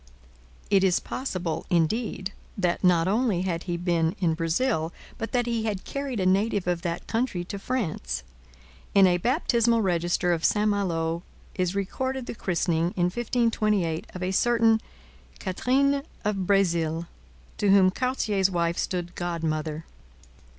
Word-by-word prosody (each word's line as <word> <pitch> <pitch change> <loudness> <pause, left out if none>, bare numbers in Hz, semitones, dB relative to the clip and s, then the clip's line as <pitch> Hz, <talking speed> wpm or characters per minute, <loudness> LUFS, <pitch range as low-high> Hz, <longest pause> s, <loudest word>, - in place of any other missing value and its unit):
It 195 -1 +5
is 185 -2 +3
possible, 185 - -3
indeed, 190 +3 0 0.2
that 180 -2 0
not 175 -2 +4
only 205 -3 +1
had 170 -2 -2
he 175 -2 -2
been 170 0 +1
in 170 -4 +2
Brazil, 165 +1 0 0.3
but 225 - -4
that 245 -1 +1
he 230 -2 -1
had 205 -4 -2
carried 275 -5 -3
a 185 - 0
native 200 +1 +2
of 175 -1 0
that 170 -1 -3
country 225 -6 -1
to 200 +2 -6
France. 155 - -2 0.7
In 195 -1 +8
a 175 -1 +3
baptismal 235 - +2
register 175 -1 +1
of 165 -1 -2
St 210 0 +3
Malo 170 -5 0 0.3
is 185 -1 -1
recorded 260 +6 -2
the - - -5
christening, 170 -4 0
in 175 0 +2
1528, 215 -8 0
of 185 - -4
a 185 - 0
certain 225 +1 +3 0.6
'Catherine 270 +8 +1 0.2
of 195 -3 -1
Brezil,' 170 -4 +2 0.5
to 205 - +2
whom 195 -1 +6
Cartier's 210 -5 +1
wife 170 -1 0
stood 175 -2 -2
godmother. 160 -3 -3
185 Hz, 145 wpm, -26 LUFS, 170-225 Hz, 0.7 s, In